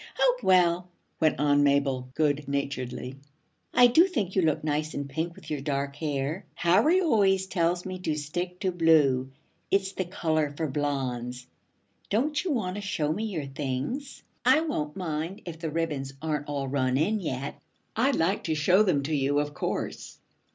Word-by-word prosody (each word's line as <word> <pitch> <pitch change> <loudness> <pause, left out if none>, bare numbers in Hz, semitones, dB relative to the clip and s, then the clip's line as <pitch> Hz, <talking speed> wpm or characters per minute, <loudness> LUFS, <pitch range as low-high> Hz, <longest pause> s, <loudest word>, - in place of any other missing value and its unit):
'Oh, - - +3
well,' 180 -1 +3 0.3
went 155 -4 +2
on 145 0 +4
Mabel 140 -3 +2
good 145 -2 +1
naturedly, 135 -2 -3 0.6
'I 250 - +8
do 320 +10 +6
think 215 - -2
you 190 - +4
look 155 -3 +1
nice 155 0 -1
in 140 0 -3
pink 160 +5 -3
with - - -11
your 145 -2 -2
dark 140 -1 -2
hair. 145 +3 -2
Harry 210 - +4
always 200 - +3
tells 175 -1 0
me 185 -1 -5
to 160 -4 -1
stick 175 +5 -4
to 190 - +1
blue. 150 -7 +3 0.4
It's 195 -1 +1
the 190 -1 -3
color 155 -4 -1
for 160 - -1
blondes. 130 -4 -2 0.6
Don't 290 - +1
you 375 - -2
want 195 -8 -1
to - - -4
show 155 -7 -1
me 215 +7 -3
your 175 -9 -3
things? 140 - -4 0.2
I 310 - +5
won't 155 - -3
mind 170 +3 -4
if 165 -2 -7
the 165 -1 -3
ribbons 150 -4 -2
aren't 150 -1 -2
all 140 -2 -2
run 130 -1 +1
in 205 +9 +1
yet.' 140 -6 -4 0.3
'I'd 265 +5 +2
like 185 +5 +1
to 160 - 0
show 180 +6 +4
them 180 -9 +2
to 155 +3 -2
you, 140 0 +1
of 145 0 -2
course. - - -4
155 Hz, 175 wpm, -27 LUFS, 140-185 Hz, 0.6 s, I